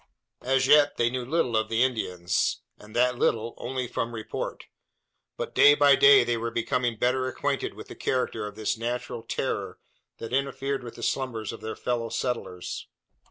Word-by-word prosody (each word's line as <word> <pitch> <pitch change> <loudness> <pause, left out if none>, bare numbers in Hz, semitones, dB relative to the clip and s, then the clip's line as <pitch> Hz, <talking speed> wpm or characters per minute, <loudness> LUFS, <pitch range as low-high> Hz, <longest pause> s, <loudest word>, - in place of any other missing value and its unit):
As 130 +1 +2
yet 145 +1 +5
they 120 0 +2
knew 130 0 -2
little 130 -3 0
of 110 0 +1
the 115 +2 +3
Indians, 95 -8 0 0.2
and 105 +1 -14
that 125 0 +2
little 115 +1 +1
only 125 0 -3
from 115 0 -3
report; 110 - -5 0.7
but, - - -4
day 145 0 +7
by 145 -1 +6
day, 140 -1 +7
they 120 0 0
were 115 +1 -2
becoming 120 0 -1
better 130 +3 +1
acquainted 130 - -2
with - - -10
the - - -9
character 115 -4 -1
of 105 - -9
this 110 -1 -1
natural 120 0 -3
"terror" 115 - -3 0.4
that 115 +1 -7
interfered 135 0 -1
with 120 - -9
the - - -9
slumbers 115 -6 -2
of - - -10
their 110 - -5
fellow 120 -2 -2
settlers. 115 -8 -4
120 Hz, 175 wpm, -27 LUFS, 115-130 Hz, 0.7 s, day